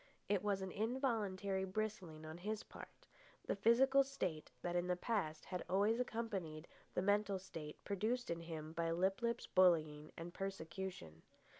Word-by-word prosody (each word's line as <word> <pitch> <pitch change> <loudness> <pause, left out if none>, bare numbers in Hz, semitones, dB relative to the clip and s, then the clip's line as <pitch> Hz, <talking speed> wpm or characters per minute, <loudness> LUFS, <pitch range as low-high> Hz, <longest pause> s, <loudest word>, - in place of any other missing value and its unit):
It 200 -2 +2
was 200 -2 +1
an 190 - -4
involuntary 210 -5 0
bristling 190 -5 -3
on 160 +2 -7
his 215 +3 -2
part, - - -12 0.4
the - - 0
physical 260 +7 +6
state 185 - -3
that 175 0 -1
in 175 0 +1
the 180 - +2
past 180 -6 -1
had 180 -1 -3
always 205 +5 +3
accompanied 195 -10 -2 0.3
the 180 - +2
mental 205 0 +3
state 160 -5 -7
produced 220 +4 0
in 170 - -1
him 160 -2 -6
by 165 0 0
Lip 185 +5 +2
lip's 235 0 0
bullying 155 -5 +4
and 170 +1 -6
persecution. 185 - -5
190 Hz, 155 wpm, -40 LUFS, 165-215 Hz, 0.4 s, physical